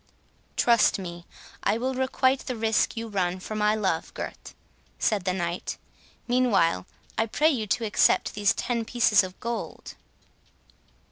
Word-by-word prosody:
"Trust 235 -2 +4
me, 175 -2 -8 0.3
I 220 - +1
will 260 +3 -1
requite 260 0 +1
the 255 - -2
risk 225 +1 +1
you 230 0 -3
run 185 -3 -1
for 200 - -7
my 210 0 +2
love, 190 -6 -1
Gurth," - - -7 0.4
said 205 -5 0
the 185 - +2
Knight. 175 -1 -3 0.5
"Meanwhile, 210 - +2 0.3
I 225 - +2
pray 305 +8 +3
you 225 -7 -2
to 225 +4 0
accept 210 - +3
these 205 -1 +2
ten 235 -2 -1
pieces 225 -3 +3
of 185 0 -8
gold." 235 0 -5
215 Hz, 145 wpm, -26 LUFS, 190-240 Hz, 0.5 s, Trust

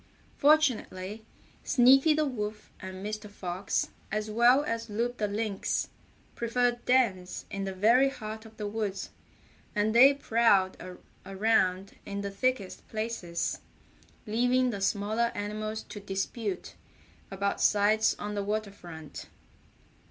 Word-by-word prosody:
Fortunately 225 -9 +2 0.4
Sneaky 270 +4 +5
the 310 0 +2
Wolf 210 -5 -5
and 190 0 -7
Mr. 215 0 -5
Fox, 185 -1 -2 0.2
as 215 +1 -2
well 240 +5 +5
as 230 -4 -3
Loup 235 +4 -2
the 210 - 0
Lynx, 205 -1 -2 0.4
preferred 240 +1 0
dens 205 -8 +1
in 195 0 -3
the 195 - -3
very 235 +8 +5
heart 220 -4 -7
of 220 -1 -15
the 210 - -4
woods, 205 -2 -3 0.6
and 210 +1 +1
they 265 +4 +8
prowled 225 -8 +3 0.5
around 195 -1 +1
in 200 0 -5
the 200 0 -4
thickest 240 -2 -2
places, 215 -6 -3 0.7
leaving 245 +3 +2
the 200 -3 -5
smaller 215 +4 0
animals 215 +1 -4
to 210 - -9
dispute 195 0 -4 0.6
about 200 +1 -2
sites 210 +1 +3
on 210 0 -5
the 205 -1 -2
water 210 0 -2
front. 160 -6 -10
215 Hz, 125 wpm, -29 LUFS, 200-235 Hz, 0.7 s, they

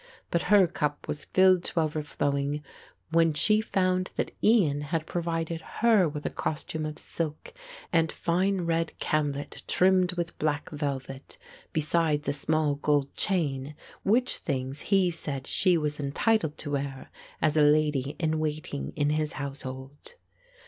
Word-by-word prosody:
But 170 - +2
her 205 -2 +7
cup 150 -3 -3
was 145 - -3
filled 185 -1 +4
to - - -1
overflowing 145 -2 -1 0.5
when 165 -2 +3
she 215 +8 +3
found 185 -3 0
that - - -2
Ian 175 -11 +4
had 155 +2 -2
provided 165 -1 -2
her 215 -6 +3
with 150 0 -7
a - - -1
costume 155 0 -3
of 150 - -6
silk 155 -2 -4 0.4
and 165 -1 +3
fine 185 +3 0
red 165 -1 0
camlet 145 -2 -2
trimmed 185 -1 +3
with 170 -1 -4
black 150 -2 -1
velvet, 135 -2 -5 0.3
besides 155 -1 +1
a - - +1
small 150 +1 +1
gold 145 -1 +1
chain, 150 -7 -1 0.3
which 240 +5 +2
things 135 -1 -3
he 190 -3 +4
said 140 -5 -4
she 180 -3 +3
was 150 -1 -1
entitled 155 +4 +1
to 145 - -6
wear 140 -1 -4 0.3
as 155 -1 +2
a 155 - +5
lady 150 -2 +3
in 160 -1 0
waiting 150 - -3
in 145 0 +1
his 155 0 0
household. 135 - -7
155 Hz, 145 wpm, -28 LUFS, 145-170 Hz, 0.5 s, her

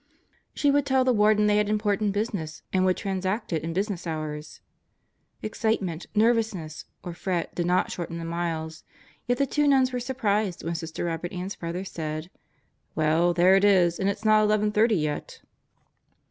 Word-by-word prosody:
She 285 - +3
would 285 0 +2
tell 265 -1 +3
the 255 - +3
Warden 210 -1 +4
they 210 0 +3
had 210 0 +1
important 210 -1 +1
business 195 -7 -3
and 185 0 +3
would 185 -1 +2
transact 190 +1 -2
it 160 - 0
in 165 - -3
business 190 0 -2
hours. 155 -1 -5 0.8
Excitement, 210 -6 -2
nervousness, 215 -8 +1 0.2
or 175 - -5
fret 175 -1 -3
did 175 0 -2
not 180 +1 +2
shorten 170 -1 -5
the 165 - -5
miles, 165 -1 -3 0.4
yet 245 0 +1
the 275 - +2
two 295 +2 +1
nuns 260 -2 +3
were 250 - -1
surprised 215 -7 -1
when 165 - -2
Sister 165 -1 -5
Robert 170 +1 -3
Ann's 185 +2 -5
brother 175 +3 -5
said: 155 -1 -5 0.6
"Well, 160 +3 +3
there 180 +2 +5
it 195 - +3
is, 180 -4 +4
and 195 - +1
it 200 - -2
is - - -16
not 215 0 +5
11:30 210 0 +2
yet." 150 -1 -4
190 Hz, 175 wpm, -26 LUFS, 170-215 Hz, 0.8 s, there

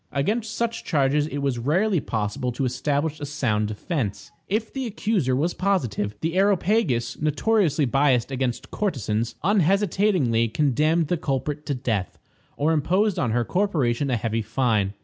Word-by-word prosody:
Against 215 +11 -1
such 235 -1 -2
charges 145 -1 +1
it 145 -2 -4
was 130 -4 0
rarely 175 - +2
possible 120 +2 -2
to 135 - -1
establish 145 +4 -1
a 145 - -4
sound 115 -8 0
defense. 105 - -4 0.2
If 220 +3 -2
the 265 -2 -3
accuser 200 - 0
was 160 +6 0
positive, 120 - -1
the 165 +1 -1
Areopagus, 190 - +1
notoriously 155 0 +2
biased 135 -1 +2
against 130 -2 -2
courtesans, 120 - -1
unhesitatingly 190 - +2
condemned 150 +6 +1
the 175 - +1
culprit 150 0 -3
to 140 - 0
death, 110 -7 -2 0.4
or 150 +3 +2
imposed 185 +7 +1
on 125 - +1
her 120 +1 +1
corporation 145 - 0
a 125 - +1
heavy 115 +1 -1
fine. 110 -3 0
145 Hz, 150 wpm, -24 LUFS, 120-185 Hz, 0.4 s, rarely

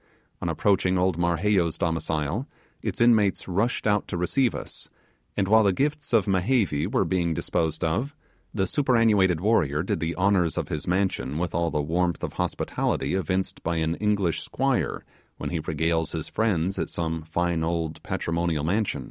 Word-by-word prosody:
On - - -1
approaching 95 -2 +2
old 90 -1 +2
Marheyo's 85 0 +1
domicile, 80 - -1 0.3
its - - -3
inmates 110 -4 +3
rushed 100 +7 0
out 105 -1 +2
to 90 - -3
receive 120 +9 +1
us; - - -7 0.5
and 100 -2 +1
while 110 +2 +6
the 100 - +4
gifts 145 +8 -1
of 110 -6 +4
Mehevi 95 - +1
were 130 - +2
being 85 -3 0
disposed 80 0 -1
of, 120 - -1 0.4
the 95 -3 0
superannuated 110 - +3
warrior 80 -8 +2
did 90 - -1
the 80 +1 -2
honours 90 -4 +2
of - - -2
his 75 - -4
mansion 90 -6 0
with 85 0 -2
all 85 0 +1
the 75 -2 -1
warmth 85 +2 0
of - - -3
hospitality - - -1
evinced 95 +1 -1
by 85 +1 -1
an 80 0 0
English 100 -3 0
squire - - -1 0.3
when - - -4
he 85 - -1
regales 80 +1 -1
his - - -3
friends 95 -4 0
at - - -2
some 80 -1 -2
fine 85 +1 -1
old 80 -1 -2
patrimonial 85 -2 -1
mansion. 95 -1 0
90 Hz, 165 wpm, -26 LUFS, 80-105 Hz, 0.5 s, while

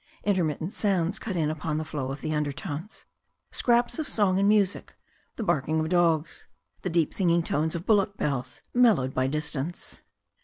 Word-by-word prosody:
Intermittent 175 -3 0
sounds 190 -2 0
cut 205 -4 -4
in 155 -3 +1
upon 155 0 -3
the 155 - -2
flow 140 -4 -4
of 135 - -6
the 155 - -2
undertones 150 +4 -4 0.2
— - - -50
scraps 240 +4 +2
of 310 - -2
song 195 -3 +2
and 200 +1 +4
music, 205 -2 +1 0.4
the 230 - -4
barking 155 -3 +1
of 155 0 -1
dogs, 170 -3 +1 0.3
the 185 - -2
deep 165 -2 +1
singing 170 -3 +2
tones 160 +1 0
of 170 +2 -5
bul 220 - +5
lock 200 0 -1
bells, 130 -3 -3
mellowed 215 - +4
by 130 0 +1
distance. 150 +2 -4
165 Hz, 180 wpm, -27 LUFS, 150-200 Hz, 0.4 s, bul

